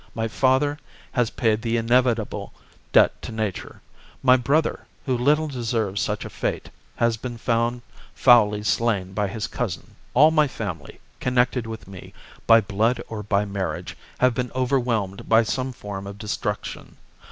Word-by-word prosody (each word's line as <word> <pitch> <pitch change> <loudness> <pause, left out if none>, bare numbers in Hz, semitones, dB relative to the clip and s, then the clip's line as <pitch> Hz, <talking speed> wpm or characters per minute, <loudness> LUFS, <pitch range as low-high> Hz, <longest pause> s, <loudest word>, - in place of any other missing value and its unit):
My 115 0 -1
father 135 +6 +1 0.3
has 125 -4 +1
paid 110 -2 0
the 115 0 0
inevitable 120 -1 +1 0.4
debt - - +4
to - - -7
nature. 110 -4 -4 0.4
My 130 -1 +7
brother, 140 +6 0 0.2
who 130 -3 +1
little 150 +6 +2
deserved 115 -7 -2
such - - -2
a - - -6
fate, - - -3 0.2
has 115 -1 +1
been 120 +1 -6 0.8
foully 105 -5 +5
slain 105 -4 0
by 105 0 0
his 105 +2 -4
cousin. 100 -9 -4 0.2
All 150 +5 +7
my 155 -2 +4
family, - - -6 0.2
connected 125 -1 +1
with 110 -3 -8
me 95 -2 -11 0.3
by 115 0 +7
blood 110 +4 0
or 110 -2 -5
by 105 0 0
marriage, 100 -1 -4 0.2
have 125 -1 +3
been 125 0 -3
overwhelmed 120 -7 -1
by 115 +1 +6
some 130 +4 -2
form 100 -4 -7
of 100 0 -8
destruction. 105 0 -4
115 Hz, 150 wpm, -24 LUFS, 105-125 Hz, 0.8 s, My